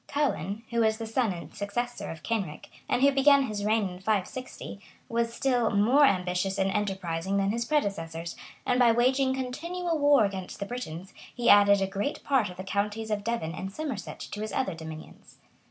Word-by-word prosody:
Ceaulin, 220 - -1
who 235 - 0
was 220 -1 +3
the 225 - -5
son 225 0 0
and 170 -2 -8
successor 240 +4 -3
of 160 -1 -8
Kenric, 195 -10 -3 0.2
and 250 - +2
who 280 - +7
began 280 0 +5
his 210 -5 -3
reign 215 -1 +2
in 180 -1 -8
560, 215 +2 -3 0.3
was 230 0 0
still, 245 -2 +1
more 240 +8 +5
ambitious 185 -2 +1
and 195 0 +1
enterprising 190 -2 -1
than 195 0 +2
his 235 +1 -1
predecessors; 170 - -2 0.3
and 250 - +2
by 240 -2 +6
waging 260 +3 +2
continual 330 +6 -3
war 285 -6 +5
against 190 -2 -5
the 200 - -3
Britons, 190 -6 -6 0.2
he 240 - +4
added 200 -1 +6
a - - +2
great 200 +8 -3
part 260 -8 +2
of 180 - -10
the 185 - -5
counties 210 +3 -2
of 205 -1 -1
Devon 225 -8 -2
and 190 +2 -5
Somerset 265 -3 -5
to 210 - -6
his 215 - -3
other 255 -8 -1
dominions. 160 -1 -10
210 Hz, 185 wpm, -28 LUFS, 195-250 Hz, 0.3 s, who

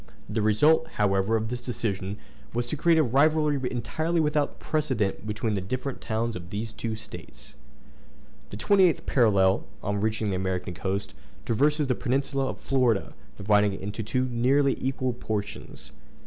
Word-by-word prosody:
The 110 +1 -1
result, 150 +10 +4
however, 100 +1 +2
of 110 0 -1
this 125 0 -4
decision 105 -5 -3 0.4
was 120 0 0
to - - -1
create 165 +2 +3
a 160 - +5
rivalry 150 +3 +3
entirely 160 +7 -1
without 150 -2 0
precedent 130 -10 -1
between 110 +1 -1
the 100 - -1
different 130 +7 -4
towns 115 +1 -2
of 85 -1 -7
these 110 +3 -4
two 110 -1 -3
States. 110 -8 -9 1.0
The - - -7
28th 185 - +3
parallel, 100 -7 +3 0.2
on 100 0 -1
reaching 110 -1 0
the 95 - 0
American 95 -1 -2
coast, 95 +3 -3 0.3
traverses 150 +6 +2
the 130 - +2
peninsula 135 +2 -1
of - - -5
Florida, 125 -6 +1 0.2
dividing 105 0 +3
it - - -7
into 105 +3 -4
two 125 +4 0
nearly 130 +3 +2
equal 130 -1 -1
portions. 105 -10 -5
115 Hz, 155 wpm, -27 LUFS, 105-135 Hz, 1.0 s, a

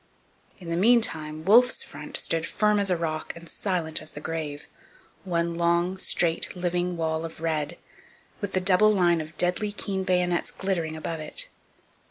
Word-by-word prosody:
In 180 - -11
the 170 - -1
meantime 165 -8 +2
Wolfe's 240 +6 +5
front - - -7
stood 165 0 0
firm 210 -1 +2
as 200 -1 +1
a 180 - +2
rock 155 -1 -3
and 170 0 -11
silent 170 -4 -1
as 155 - -6
the - - -7
grave, 155 -2 -5 0.6
one 170 -1 -1
long, 170 +2 +1
straight, 170 -2 +1
living 175 0 -1
wall 160 -1 -1
of 165 -1 -7
red, 160 -2 -1 0.6
with 205 -2 -4
the 185 - +1
double 190 +3 +5
line 175 -5 +3
of 155 +1 -10
deadly 180 +4 0
keen 195 -2 -3
bayonets 180 -1 +1
glittering 170 -5 -2
above 160 +1 -4
it. 155 - -2
170 Hz, 165 wpm, -26 LUFS, 160-190 Hz, 0.6 s, Wolfe's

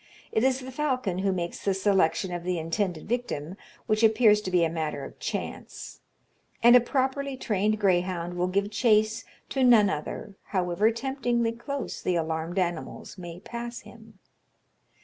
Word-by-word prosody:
It 220 - +1
is 265 0 +2
the 260 +1 -7
falcon 255 -9 -1
who 195 0 +1
makes 175 -2 -4
the 195 -1 +1
selection 190 -2 +2
of 175 -1 -4
the 180 0 -1
intended 165 +1 -2
victim 195 -9 -3 0.3
which 215 -1 +1
appears 220 -1 +5
to 190 - -4
be 180 -2 +3
a - - +3
matter 160 -2 -3
of - - -12
chance - - -5 0.6
and 240 +1 +8
a - - +10
properly 265 +2 -1
trained 210 -2 0
greyhound 180 -3 +1
will 180 +1 0
give 200 +2 0
chase 215 -1 +2 0.2
to 270 - 0
none 220 -5 +6
other, 155 +5 -5
however 185 +2 +1
temptingly 240 -1 -1
close 275 +4 -5
the 180 - 0
alarmed 160 +1 -2
animals 175 +1 -3
may 175 0 -8
pass 235 +2 -6
him. 220 -3 -15
205 Hz, 160 wpm, -27 LUFS, 175-235 Hz, 0.6 s, a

